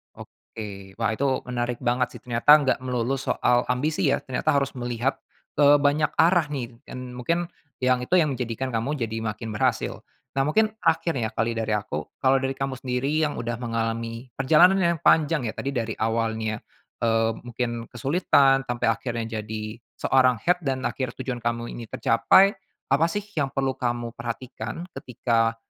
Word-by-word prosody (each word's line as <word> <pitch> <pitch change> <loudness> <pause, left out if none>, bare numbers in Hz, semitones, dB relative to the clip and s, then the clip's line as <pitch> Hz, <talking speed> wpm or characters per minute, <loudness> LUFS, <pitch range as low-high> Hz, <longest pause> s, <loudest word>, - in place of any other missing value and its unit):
Oke, 100 -3 -10
wah - - 0
itu 130 +3 0
menarik 120 -1 -2
banget 125 +1 0
sih, - - -8
ternyata 125 +4 +6
enggak 145 -4 +2
melulu 125 +1 -1
soal 120 -2 +1
ambisi 140 +5 0
ya - - -7
ternyata 130 +2 0
harus 140 -1 +1
melihat, 120 +2 -1 0.4
eee, 145 0 +7
ke 145 - +1
banyak 150 +2 +3
arah 165 0 +4
nih 125 -5 -6
kin 125 - -7
mungkin 125 +8 -1 0.4
yang 125 0 +3
itu 125 +9 0
yang 160 -5 +4
menjadikan 125 0 -3
kamu 115 +6 -1
jadi 115 -4 -3
makin 110 0 -4
berhasil. 115 +2 0 0.4
Nah, - - +4
mungkin 215 +7 +3
terakhir 165 -1 +2
nih - - -1
ya - - -9
kali 115 +2 +1
dari 115 -1 -1
aku. 105 0 -4 0.2
Kalau 135 +1 +5
dari 135 0 -2
kamu 135 -1 -3
sendiri 130 +2 -1 0.2
yang 145 - -5
udah 120 0 -4
mengalami 115 +1 -3
perjalanan 165 +8 +5
yang 170 -3 +1
panjang 155 -2 +4
ya, - - -2
tadi 140 +4 -4
dari 115 -2 -1
awalnya, 110 -1 -1 0.4
eee, 115 -1 +3
mungkin 120 -1 -4
kesulitan 135 0 +3
sampe 120 -3 -2
akhirnya 115 -1 -2
jadi 110 0 -5 0.2
seorang 130 -3 +3
head 180 +8 +1
dan 135 -2 -1
akhir 130 -3 -3
tujuan 130 -2 -3
kamu 120 0 -2
ini 115 -2 -7
tercapai, 185 - +4 0.4
apa 140 +4 +4
sih 205 -1 -2
yang 140 -3 0
perlu 135 -1 0
kamu 120 -1 -2
perhatikan 120 +7 -6
ketika 115 -2 0
125 Hz, 170 wpm, -25 LUFS, 115-140 Hz, 0.4 s, eee